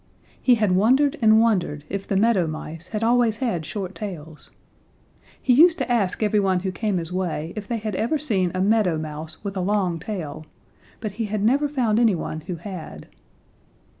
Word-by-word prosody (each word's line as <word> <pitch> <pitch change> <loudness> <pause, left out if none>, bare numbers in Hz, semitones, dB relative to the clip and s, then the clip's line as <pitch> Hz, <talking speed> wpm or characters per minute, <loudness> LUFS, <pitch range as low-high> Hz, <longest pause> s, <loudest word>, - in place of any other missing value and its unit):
He 250 - +5
had 210 -4 +1
wondered 260 +10 +3
and 220 -1 +6
wondered 185 -10 +1
if 200 0 -5
the 195 - 0
Meadow 200 -5 +3
Mice 155 +2 -6
had 215 0 -3
always 235 -1 +3
had 185 - -2
short 195 -3 -5
tails. 165 -8 -8 0.9
He 255 - +2
used 335 +6 +6
to 250 - -2
ask 215 -3 +1
everyone 195 -3 +2
who 190 0 -2
came 210 0 -1
his 170 0 -4
way 170 -3 -3
if 210 -2 -6
they 235 - -1
had 215 -1 -4
ever 235 +11 0
seen 195 - 0
a 185 - 0
Meadow 200 -4 +2
Mouse 155 +2 -7
with 200 -1 -4
a 185 - -1
long 185 -3 0
tail, 160 -5 -6 0.5
but 215 -2 -3
he 220 +3 -3
had 210 -1 -2
never 280 +6 +2
found 235 -6 +1
any 225 -5 +4
one 160 -1 -5
who 180 - -3
had. 170 - -8
200 Hz, 190 wpm, -23 LUFS, 175-225 Hz, 0.9 s, and